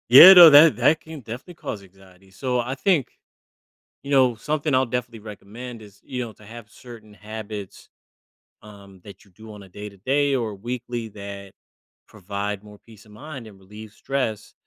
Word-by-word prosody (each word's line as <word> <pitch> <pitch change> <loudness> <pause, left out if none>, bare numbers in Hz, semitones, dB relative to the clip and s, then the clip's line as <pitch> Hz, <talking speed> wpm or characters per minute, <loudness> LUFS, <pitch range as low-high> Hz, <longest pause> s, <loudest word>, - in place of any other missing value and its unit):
Yeah 155 +10 +11
no, 175 -3 +10
that 150 -1 +7
that 150 +6 +3
can 160 -1 -10
definitely 120 - -9
cause 105 -10 -7
anxiety, 95 0 -21
so, 125 +4 -3
I 125 +3 -3
think 145 0 +1 1.0
you 140 - -9
know, 130 -3 +3
something 150 +5 -3
I'll 130 0 +2
definitely 120 -1 -5
recommend 110 +3 -11
is, 105 -2 -17
you 125 -1 -5
know, 115 - -10
to 105 - -22
have 115 0 -12
certain 115 -3 -14
habits, 105 -1 -9 0.7
um, 100 -3 -16
that 100 -1 -14
you 100 - -25
do 110 +4 -14
on 105 - -12
a - - -15
day-to-day, 105 +9 -2
or 115 -4 -2
a - - -9
weekly, 120 +1 -6
that 100 -1 -10 0.6
provide 100 0 -6
more 105 0 -15
peace 110 -2 -18
of 105 - -19
mind, 135 +2 -10
and 100 -3 -16
relieve 105 +3 -13
stress, 110 -4 -4
110 Hz, 175 wpm, -22 LUFS, 105-130 Hz, 1.0 s, Yeah